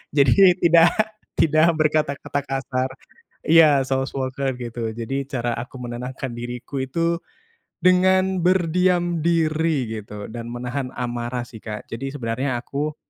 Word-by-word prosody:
Jadi 175 +7 +6
tidak 170 0 +6 0.5
tidak 155 +1 +4
berkata-kata 150 -2 0
kasar, 130 -1 -2 0.6
iya 155 -4 +6
soft 135 0 -1
spoken 130 -1 -3
gitu, 120 -2 -4
jadi 135 +4 -2
cara 120 -2 -1
aku 125 +3 -7
menenangkan 125 +1 -5
diriku 125 +3 -5
itu 165 +5 -1 0.6
dengan 185 +1 +4
berdiam 175 -1 +2
diri 155 -7 0
gitu, 105 0 -9
dan 115 0 -6
menahan 125 +2 -4
amarah 120 0 -3
sih, 115 -2 -12
Kak, 105 -1 -6
jadi 135 +5 -5
sebenarnya 125 +1 -2
aku 150 +2 -3
135 Hz, 125 wpm, -22 LUFS, 120-165 Hz, 0.6 s, Jadi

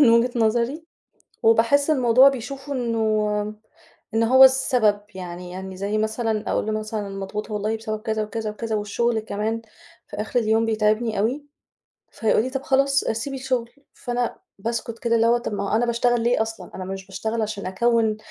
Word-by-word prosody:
من 265 -6 +7
وِجهة 235 +2 +4
نظري 235 +7 +1 0.6
وباحس 230 +6 +4
الموضوع 260 -2 +6
بيشوفه 275 +2 -6
إنه 215 -4 0 0.6
إن 225 - +3
هو 260 +3 +7
السبب، 250 -6 +4
يعني 180 -1 -7
يعني 190 +1 -7
زي 200 +3 -2
مثلًا 220 0 -1
أقوله - - 0
له 215 - 0
مثلًا: 215 0 -4
"أنا 205 - -5
مضغوطة 195 +2 -5
والله." 210 +2 -1
بسبب 215 -1 -4
كذا 220 -1 -1
وكذا 215 +1 -4
وكذا 220 +1 -3
والشغل 220 +3 0
كمان 220 +1 -3 0.4
في - - -9
آخِر 215 +4 -1
اليوم 225 0 +2
بيتعِبني 215 0 +1
أوي. 250 +8 0 0.7
فيقول 220 -1 +1
لي: 255 - -3
"طَب 270 0 -3
خلاص، 275 0 +3
سيبي 230 +5 -2
الشغل." 255 -3 -2 0.2
فأنا 245 0 -2 0.2
باسكُت 230 +2 -4
كده 230 0 +1
اللي 230 0 +3
هو 235 +1 +4
طَب 235 - -5
ما 205 - -2
هو - - +4
أنا 240 +2 +2
باشتغل 240 0 +2
ليه 235 0 +2
أصلًا؟ 220 -5 -7
أنا 185 - -5
مش 190 0 -6
باشتغل 220 +4 -3
عشان 210 -2 -4
أكوّن 220 +3 +1
225 Hz, 175 wpm, -23 LUFS, 210-240 Hz, 0.7 s, من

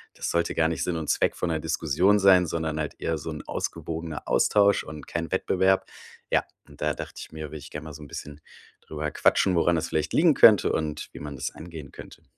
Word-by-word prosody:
das - - -3
sollte 85 0 0
gar 80 -1 +3
nicht 85 - -2
Sinn 90 - -1
und 80 -2 -4
Zweck - - +1
von 90 - -2
'ner 80 - -1
Diskussion 80 +5 +2
sein, 95 -3 +5
sondern 80 -1 -2
halt 75 -2 -3
eher 80 -1 -2
so 80 - -6
'n 75 -1 -6
ausgewogener 80 -1 -5
Austausch 100 -1 +3
und 80 -1 -9
kein 85 0 -4
Wettbewerb. 95 0 +2 0.5
Ja, - - +3 0.2
und 75 -1 -17
da 75 0 0
dacht - - -8
ich - - -9
mir, 80 -2 -7
würd 75 - -7
ich - - -11
gern 75 - -7
mal 80 -1 -9
so 75 - -11
'n 75 - -10
bisschen 75 +2 -8 0.4
drüber 75 -1 -5
quatschen, 95 - +3
woran 85 +1 +3
das 80 - -2
vielleicht 75 0 -1
liegen 165 -1 +5
könnte 110 -7 +6
und 75 -1 -3
wie - - -10
man 75 -1 -7
das 65 +2 -4
angehen 80 -4 -10
könnte. - - -12
80 Hz, 230 wpm, -26 LUFS, 75-85 Hz, 0.5 s, könnte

